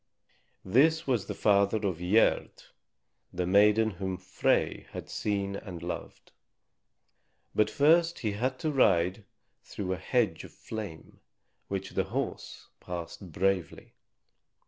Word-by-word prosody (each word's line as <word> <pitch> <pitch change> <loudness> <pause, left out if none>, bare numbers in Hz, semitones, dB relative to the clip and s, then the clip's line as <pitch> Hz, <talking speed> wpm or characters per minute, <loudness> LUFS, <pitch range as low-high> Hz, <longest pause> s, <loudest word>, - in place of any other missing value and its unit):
This 155 - +3
was 125 -7 0
the - - -4
father 100 0 +3
of 90 -4 -1
Gerd, 95 +6 +2 0.7
the 90 - -2
maiden 105 +4 +4
whom 95 0 -4
Frey 95 +1 0
had - - -7
seen 100 -2 -2
and 90 -5 -8
loved. 90 - -7 1.2
But 105 0 +3
first 165 +4 +4
he 110 - -2
had 125 +6 -2
to 155 - 0
ride 95 - +2 0.4
through 95 -2 -4
a - - -4
hedge 100 -2 0
of - - -11
flame, 105 -8 -8 0.5
which 95 -1 -4
the - - 0
horse - - -5
passed 90 +1 -7
bravely. 95 -1 -1
100 Hz, 125 wpm, -29 LUFS, 90-110 Hz, 1.2 s, maiden